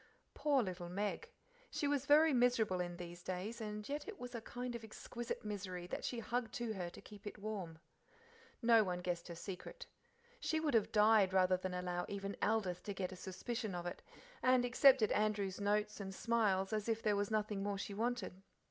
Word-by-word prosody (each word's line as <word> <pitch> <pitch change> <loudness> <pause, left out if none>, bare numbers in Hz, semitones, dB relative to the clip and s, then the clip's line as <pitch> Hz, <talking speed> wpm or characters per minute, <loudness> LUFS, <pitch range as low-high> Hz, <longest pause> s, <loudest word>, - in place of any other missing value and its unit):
Poor 285 -4 +3
little 180 -3 -5
Meg! 205 - -2 0.4
She 290 - -1
was 285 -2 0
very 305 +1 +7
miserable 240 -6 +3
in 175 -1 -4
these 175 0 -8
days, 190 +6 -4
and 210 -1 -4
yet 290 +1 -3
it 430 -2 -6
was 250 0 -7
a 235 - -4
kind 245 +2 -5
of 235 -1 -6
exquisite 230 +1 -6
misery 185 -4 -4
that 180 - -4
she 245 - -2
hugged 230 0 -2
to 235 -2 -2
her 180 -4 -3
to - - -12
keep 205 0 -11
it 205 - -6
warm. 200 -6 -5 0.9
No 230 -1 +7
one 180 -2 -2
guessed 175 -1 -2
her 170 - -6
secret. 185 - -7 0.5
She 315 - 0
would 310 -2 0
have 225 -3 +3
died 210 -3 +5
rather 185 -1 +5
than 185 0 -3
allow 180 -1 -2
even 200 0 -4
Aldith 200 -5 +1
to 205 - -3
get 185 -1 -2
a - - -6
suspicion 210 +3 -4
of 175 0 -4
it, 175 - -4 0.4
and 255 -1 +4
accepted 255 -2 +6
Andrew's 205 -2 +1
notes 210 +1 +1
and 190 -1 -5
smiles 210 -4 +2
as 215 +1 -1
if 225 0 0
there 210 -1 +3
was 205 0 0
nothing 215 -2 0
more 200 0 -1
she 200 +1 -4
wanted. 220 -4 -2
210 Hz, 200 wpm, -37 LUFS, 185-235 Hz, 0.9 s, very